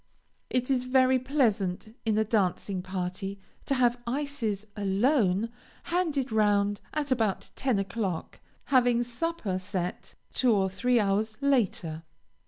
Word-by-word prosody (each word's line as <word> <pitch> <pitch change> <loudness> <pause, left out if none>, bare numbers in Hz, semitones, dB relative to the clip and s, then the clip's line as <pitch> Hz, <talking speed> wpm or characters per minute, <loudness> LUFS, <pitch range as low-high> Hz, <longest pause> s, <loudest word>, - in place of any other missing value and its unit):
It 250 +1 0
is 250 -2 +1
very 260 0 +4
pleasant 220 -7 0
in 220 -1 +2
a 220 - +4
dancing 200 -3 0
party 190 +1 -4 0.3
to 275 - +1
have 245 -1 +2
ices 240 -6 -2
alone, 205 +1 +2 0.3
handed 315 -7 0
round 205 -2 +2
at 295 -3 -2
about 225 -6 0
ten 260 -5 +1
o'clock, 195 -3 -3 0.3
having 245 -2 +4
supper 240 - -2
set 185 -2 -4 0.2
two 250 -3 +3
or 190 -2 +2
three 240 +6 +2
hours 215 +1 0
later. 200 - +1
220 Hz, 125 wpm, -28 LUFS, 195-255 Hz, 0.3 s, very